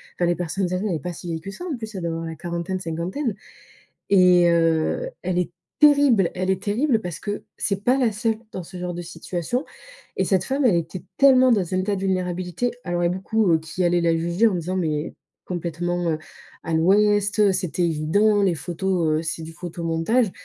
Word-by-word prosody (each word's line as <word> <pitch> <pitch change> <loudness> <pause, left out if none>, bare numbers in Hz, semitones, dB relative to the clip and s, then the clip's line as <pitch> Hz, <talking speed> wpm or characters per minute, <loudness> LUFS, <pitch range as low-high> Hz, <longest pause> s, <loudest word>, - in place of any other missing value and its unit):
Enfin, 175 - +1
les 175 - +2
personnes 180 +2 -2
âgées, 185 +3 -1
elle 180 - 0
est - - -3
pas 180 +5 -5
si 175 - -9
vieille 165 -1 -3
que 195 - -7
ça, 350 - -8
en 330 -6 -2
plus. 220 -2 -7
Elle 190 - -4
doit 170 - -1
avoir 165 0 -4
la 165 0 -5
quarantaine, 170 +3 -4
cinquantaine 180 - -3 0.7
et 180 -3 +6
heu, 165 - +1
elle 180 0 -1
est 175 -1 -1 0.3
terrible. 285 - +5
Elle 185 +1 -2
est 190 0 -1
terrible 230 +4 +1
parce 175 -5 -5
que 205 0 -4
c'est 195 -1 -1
pas 250 +4 +3
la 250 -4 +2
seule 220 +1 -1
dans 185 - -5
ce 175 +2 -10
genre 180 0 -4
de 175 - -4
situation. 175 - -3 0.5
Et 190 - +1
cette 185 -1 +2
femme, 270 +1 0
elle 215 -8 +5
était 170 +2 -3
tellement 260 -2 +6
dans 195 -7 +1
un - - +1
état 200 +2 0
de 190 - -5
vulnérabilité. 185 +3 -1
Alors, 175 -1 -1
il - - +3
y - - 0
a - - 0
beaucoup, 190 +1 +1
heu, 160 - +4
qui 160 +3 -4
allaient 175 0 +2
la 165 -1 +2
juger 170 +7 +2
en 205 - 0
disant: 180 +2 -2
«Mais 155 -4 -2 0.3
complètement, 175 0 -2
heu, 155 - -2 0.4
à 165 - -3
l'ouest! 205 +4 +3
Heu, 205 -2 +5
c'était 180 -1 -2
évident, 175 +6 +2
les 185 -3 +2
photos, 175 +2 -1
heu, - - -3
c'est 160 0 -3
du 160 - -8
photomontage». 170 +6 -1
180 Hz, 220 wpm, -23 LUFS, 170-205 Hz, 0.7 s, et